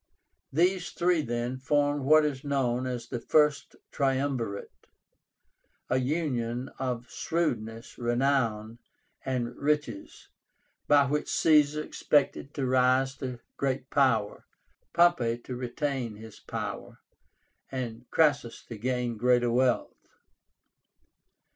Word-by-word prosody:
These 180 +4 +2
three 175 -2 +2
then 120 0 -3
formed 145 +1 +1
what 155 +2 +6
is 135 -3 -3
known 130 -3 0
as 120 -2 -4
the 120 - -3
FIRST 150 +3 +2 0.2
TRIUMVIRATE, 130 -6 -2 1.0
"a 130 - +3
union 130 -4 -2
of 125 -2 -3
shrewdness, 115 -9 -3
renown, 120 -3 0 0.4
and 125 -2 -2
riches," 150 -8 -2 0.6
by 145 -1 +5
which 150 +2 -1
Caesar 150 -1 +3
expected 145 -2 0
to 135 - -1
rise 130 +1 +3
to 125 -3 -6 0.2
great 135 -1 -2
power, 115 -7 +1 0.4
Pompey 170 -10 +3
to 125 +1 -7
retain 125 -1 -3
his 110 0 -12
power, - - -6 0.7
and 120 -2 -5
Crassus 145 -7 +1
to 115 -3 -7
gain 125 -1 -1
greater 120 +1 +3
wealth. 125 0 0
130 Hz, 105 wpm, -28 LUFS, 120-145 Hz, 1.0 s, what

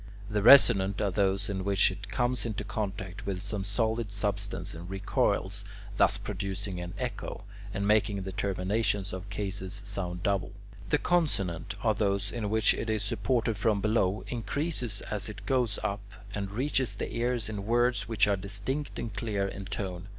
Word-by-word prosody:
The 105 0 +1
resonant 100 -5 +7
are 100 - +1
those 100 +1 +1
in 95 -3 -2
which 100 -1 +4
it 100 +1 -8
comes 120 +4 +1
into 110 -3 -3
contact 100 -1 -4
with 95 -2 -1
some 105 -3 -1
solid 110 +1 0
substance 100 -1 -1
and 85 +2 -8
recoils, 95 0 0 0.3
thus - - +4
producing 100 -2 -4
an 90 0 -6
echo, - - -4 0.3
and 100 0 -1
making 105 -2 +2
the 95 - -4
terminations 100 +1 0
of 95 +2 -6
cases 100 -2 -3
sound 90 -3 -3
double. 100 0 0 0.4
The 150 - +4
consonant 100 - 0
are 110 -2 +4
those 100 -2 0
in 110 -4 -2
which 110 0 +5
it 115 - -3
is 110 -1 0
supported 110 +2 0
from 105 0 +2
below, 105 -2 +1
increases 125 +1 -2
as 105 0 -1
it 105 -1 -9
goes 125 -5 +1
up, 100 +1 -1 0.3
and 100 -1 -3
reaches 130 +4 0
the - - -4
ears 120 -1 0
in 105 -2 -5
words 120 +1 +2
which 110 -2 +3
are 100 - +3
distinct 100 +9 -3
and 115 - -4
clear 100 -4 -1
in 100 0 -6
tone. 95 -2 -4
100 Hz, 170 wpm, -29 LUFS, 95-110 Hz, 0.4 s, resonant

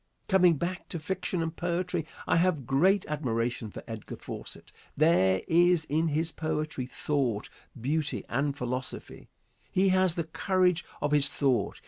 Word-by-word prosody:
Coming 180 -4 +5
back 180 +4 -4
to 175 - -4
fiction 175 +1 -2
and 165 0 -4
poetry, 175 -2 -2 0.2
I - - +2
have 165 -6 +2
great 180 - +3
admiration 120 -6 -2
for - - -9
Edgar 110 -2 -7
Fawcett. - - -8 0.3
There 95 - +4
is 175 0 +4
in 160 +3 +1
his 160 +2 0
poetry 155 -4 -3
thought, 130 -6 -1 0.3
beauty 150 +5 -1
and 140 +3 -1
philosophy. 125 +1 -5 0.4
He 190 +1 +3
has 185 -2 +3
the 170 - -1
courage 180 +2 +1 0.2
of 145 - +1
his 145 -1 +4
thought. 130 -8 0
155 Hz, 145 wpm, -29 LUFS, 135-175 Hz, 0.4 s, Coming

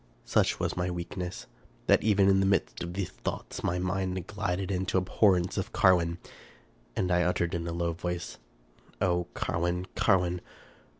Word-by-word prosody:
Such - - +2
was - - -1
my 90 0 -1
weakness, 90 +1 -5 0.4
that - - +5
even 100 -2 +4
in 95 0 +5
the 95 - +3
midst 95 -1 +1
of 85 +1 -5
these 95 -3 -2
thoughts - - -5
my 90 - 0
mind 95 0 -1
glided 100 -2 -2
into 95 0 0
abhorrence 95 -1 +2
of - - -4
Carwin, 85 -2 +4 0.8
and 90 -1 0
I 90 0 +4
uttered, 90 0 +1
in 85 -1 -2
a - - -2
low 85 0 -1
voice, 90 0 -4 0.3
" - - -29
O 90 -2 +1
Carwin! 85 +2 -1
Carwin 90 -3 +2
90 Hz, 165 wpm, -29 LUFS, 85-95 Hz, 0.8 s, that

